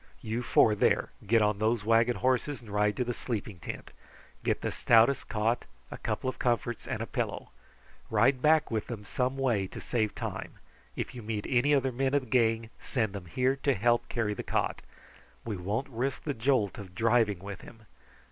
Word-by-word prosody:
You 110 +2 -2
four 115 -2 +4
there 105 - +2 0.2
get 115 -1 +4
on 105 -1 +1
those 110 0 +1
wagon 115 +2 +4
horses 130 +2 0
and 110 -4 -12
ride 105 0 +1
to - - +1
the 120 0 -2
sleeping 110 -6 -4
tent. - - -7 0.5
Get - - +1
the - - -1
stoutest 120 +3 +4
cot, 115 +2 0 0.3
a - - -6
couple - - -2
of 130 - -3
comforts, 120 -1 -1
and - - -2
a - - -3
pillow. - - -3 0.6
Ride 130 -1 +3
back 155 -1 +4
with 110 -2 -1
them 110 -4 -6
some 130 +6 -1
way 120 -8 +1
to - - -9
save 110 -4 -1
time. - - -5 0.4
If - - -4
you 125 - -7
meet 105 -1 -3
any 135 +4 +3
other 135 -1 +1
men 135 +3 0
of 140 - +2
the 125 - -13
gang, 115 -2 +2
send 110 -6 -1
them 95 -3 -7
here 130 +9 +1
to 140 -1 +1
help 120 +3 +2
carry 110 -3 -1
the - - -5
cot. - - -1 0.6
We 110 -3 -2
won't 100 +9 -2
risk 130 +1 -3
the 145 - -1
jolt 115 -5 +1
of 95 -3 -10
driving 110 -2 +3
with 100 +2 -8
him. 110 -2 -14
115 Hz, 195 wpm, -29 LUFS, 105-130 Hz, 0.6 s, four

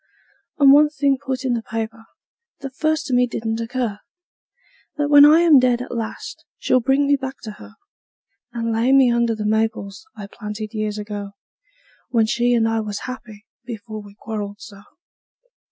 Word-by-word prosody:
And 280 -3 +6
one 295 +1 +6
thing 280 -2 0
put 265 -1 -3
in 250 - +1
the 235 - -1
paper, 225 0 -6 0.5
that 270 -1 -7
first 310 +1 0
to 265 - -3
me 250 0 +3
didn't 225 -1 -3
occur: 230 -3 -3 1.0
That 290 -1 0
when 290 0 +9
I 310 +3 +6
am 320 -5 +6
dead 250 -1 +2
at 250 - -6
last 225 -2 -6
she'll 255 - +2
bring 270 +3 +2
me 285 0 +3
back 265 -1 -5
to 215 - -6
her; 215 - -13 0.8
And 230 -1 -3
lay 235 +4 +2
me 265 -3 +5
under 235 -1 +1
the 215 -1 -5
maples 220 +3 -2
I 210 - -8
planted 210 +1 -7
years 215 -1 -3
ago, 205 -1 -6 0.8
When 230 -3 +2
she 240 +2 +1
and 225 -1 +2
I 225 0 0
was 210 -2 -5
happy 225 -4 -9 0.2
before 220 -2 -8
we 205 -1 -15
quarreled 210 -2 -6
so. 200 -4 -12
230 Hz, 175 wpm, -21 LUFS, 215-265 Hz, 1.0 s, when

